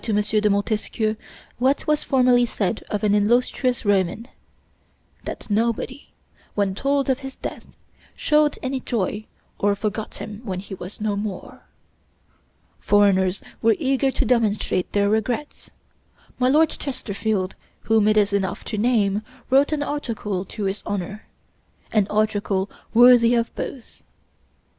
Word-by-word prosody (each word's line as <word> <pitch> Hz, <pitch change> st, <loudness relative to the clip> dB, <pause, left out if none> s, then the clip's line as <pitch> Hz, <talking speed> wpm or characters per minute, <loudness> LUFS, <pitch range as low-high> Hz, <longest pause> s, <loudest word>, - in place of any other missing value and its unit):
de 210 Hz, -1 st, +1 dB
Montesquieu 215 Hz, +1 st, 0 dB, 0.4 s
what 265 Hz, +3 st, +2 dB
was 300 Hz, 0 st, +1 dB
formerly 250 Hz, -2 st, +4 dB
said 215 Hz, -3 st, -1 dB
of 210 Hz, 0 st, -2 dB
an 205 Hz, -1 st, +3 dB
illustrious 240 Hz, +4 st, +1 dB
Roman: 205 Hz, +3 st, +1 dB, 1.0 s
that -, -, -6 dB
nobody, 235 Hz, +5 st, -1 dB, 0.4 s
when 200 Hz, -2 st, +1 dB
told 275 Hz, +6 st, 0 dB
of 265 Hz, -1 st, +1 dB
his 270 Hz, -1 st, -8 dB
death, -, -, -7 dB, 0.5 s
showed 300 Hz, -1 st, +2 dB
any 265 Hz, 0 st, -1 dB
joy 215 Hz, -3 st, -2 dB, 0.3 s
or 205 Hz, 0 st, +2 dB
forgot 215 Hz, +1 st, -4 dB
him 210 Hz, 0 st, -8 dB
when 190 Hz, -5 st, -4 dB
he 195 Hz, +1 st, -9 dB
was 185 Hz, +3 st, -9 dB
no 210 Hz, -1 st, 0 dB
more. 205 Hz, -2 st, -6 dB, 1.1 s
Foreigners 195 Hz, -2 st, +3 dB, 0.2 s
were 225 Hz, -1 st, +4 dB
eager 270 Hz, -2 st, +1 dB
to -, -, -1 dB
demonstrate 215 Hz, -6 st, +1 dB
their 200 Hz, 0 st, +2 dB
regrets: 225 Hz, +7 st, -2 dB, 0.7 s
my 255 Hz, 0 st, +3 dB
Lord 310 Hz, +3 st, +4 dB
Chesterfield, 210 Hz, -7 st, -3 dB, 0.3 s
whom 220 Hz, -2 st, +3 dB
it 215 Hz, 0 st, +3 dB
is 205 Hz, -1 st, +3 dB
enough 195 Hz, -2 st, -1 dB
to 215 Hz, -, -4 dB
name, 210 Hz, -3 st, +2 dB, 0.3 s
wrote 275 Hz, +3 st, +4 dB
an 300 Hz, -1 st, 0 dB
article 220 Hz, -10 st, -3 dB
to 210 Hz, +3 st, -6 dB
his 195 Hz, +1 st, -2 dB
honor 205 Hz, +1 st, -5 dB, 0.6 s
an 210 Hz, -3 st, +2 dB
article 205 Hz, -2 st, 0 dB, 0.2 s
worthy 240 Hz, 0 st, +7 dB
of 235 Hz, 0 st, 0 dB
both. 255 Hz, -5 st, -7 dB
215 Hz, 135 wpm, -23 LUFS, 205-250 Hz, 1.1 s, worthy